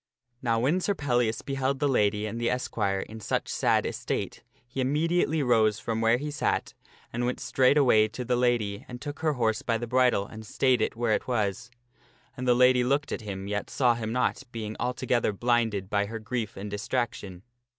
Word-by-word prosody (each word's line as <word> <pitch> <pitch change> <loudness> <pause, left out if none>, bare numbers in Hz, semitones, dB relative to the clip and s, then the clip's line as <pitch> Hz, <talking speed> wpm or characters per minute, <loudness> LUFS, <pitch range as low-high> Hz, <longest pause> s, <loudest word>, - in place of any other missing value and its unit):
Now 115 -2 +1
when 150 +10 +1
Sir 200 +2 0
Pellias 120 -7 0
beheld 135 0 -1
the 145 +1 +1
lady 105 -5 +2
and 115 +2 -4
the 120 - +1
esquire 100 -6 -1
in 110 +3 -8
such 105 - -2
sad - - +1
estate, - - -3 0.3
he 130 +2 -3
immediately 155 +3 +1
arose 110 -5 +3
from 110 +1 -3
where 115 +1 +4
he 150 +3 -4
sat 150 - -1 0.4
and 120 +1 -1
went 125 - -2
straightway 130 -5 +4
to 120 +3 -6
the 125 - +1
lady 120 -5 0
and 125 0 -8
took 145 +2 -6
her 155 -1 +1
horse 115 -4 0
by 115 - 0
the 120 - -4
bridle 125 -4 +2
and 110 +2 -10
stayed 125 +2 +1
it - - 0
where 115 -1 +1
it - - -1
was. 115 0 -1 0.7
And 130 -1 -4
the 125 - +5
lady 125 0 +5
looked 140 +3 0
at - - -3
him, 100 -2 -6
yet 105 0 -3
saw 125 -3 +3
him 110 -1 -4
not, 125 +2 0
being 110 -2 -5
altogether 125 -2 0
blinded 115 -3 0
by 100 0 0
her 115 +2 -5
grief 110 0 -4
and 100 +1 -6
distraction. 105 -4 -3
120 Hz, 195 wpm, -27 LUFS, 110-130 Hz, 0.7 s, the